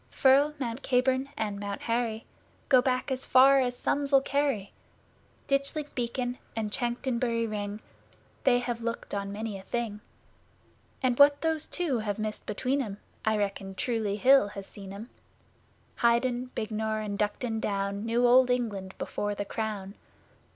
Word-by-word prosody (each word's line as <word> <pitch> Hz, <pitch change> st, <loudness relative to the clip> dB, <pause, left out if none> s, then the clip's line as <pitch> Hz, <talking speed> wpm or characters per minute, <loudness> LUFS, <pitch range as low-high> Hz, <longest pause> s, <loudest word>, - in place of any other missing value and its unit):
Firle, 280 Hz, +2 st, +4 dB
Mount 245 Hz, -1 st, -4 dB
Caburn 260 Hz, +1 st, +1 dB
and 205 Hz, -2 st, -2 dB
Mount 200 Hz, -1 st, -4 dB
Harry 230 Hz, -1 st, -1 dB, 0.4 s
Go 255 Hz, -2 st, +7 dB
back 255 Hz, +1 st, 0 dB
as 260 Hz, 0 st, -2 dB
far 270 Hz, +2 st, +6 dB
as 245 Hz, -1 st, 0 dB
sums'll 280 Hz, -1 st, +2 dB
carry. 275 Hz, -8 st, -1 dB, 0.7 s
Ditchling 275 Hz, +2 st, 0 dB
Beacon 245 Hz, 0 st, -2 dB, 0.2 s
and 215 Hz, -2 st, -2 dB
Chanctonbury 240 Hz, -1 st, -1 dB
Ring, 210 Hz, -1 st, -4 dB, 0.6 s
They 245 Hz, -, +5 dB
have 240 Hz, -1 st, -3 dB
looked 230 Hz, 0 st, -4 dB
on 200 Hz, 0 st, -2 dB
many 210 Hz, -1 st, -4 dB
a -, -, -10 dB
thing; 215 Hz, 0 st, -3 dB, 1.0 s
And 250 Hz, -1 st, +1 dB
what 285 Hz, 0 st, +7 dB
those 320 Hz, -1 st, 0 dB
two 315 Hz, -9 st, 0 dB
have 210 Hz, -2 st, -2 dB
missed 215 Hz, -1 st, -4 dB
between 255 Hz, +7 st, 0 dB
'em 205 Hz, -6 st, -5 dB, 0.3 s
I 220 Hz, 0 st, +2 dB
reckon 195 Hz, -1 st, -3 dB
Truleigh 220 Hz, -3 st, -1 dB
Hill 265 Hz, 0 st, +6 dB
has 200 Hz, -1 st, -8 dB
seen 195 Hz, -1 st, -10 dB
'em. 210 Hz, +5 st, -9 dB, 0.9 s
Highden, 245 Hz, +1 st, +2 dB
Bignor 220 Hz, 0 st, -2 dB
and 205 Hz, -1 st, -3 dB
Duncton 220 Hz, +2 st, -1 dB
Down 200 Hz, -1 st, -2 dB
Knew 235 Hz, +2 st, +2 dB
Old 250 Hz, +1 st, +6 dB
England 205 Hz, -7 st, -2 dB
before 205 Hz, 0 st, -3 dB
the 205 Hz, -, -3 dB
Crown. 205 Hz, -3 st, -4 dB
235 Hz, 150 wpm, -28 LUFS, 210-255 Hz, 1.0 s, Go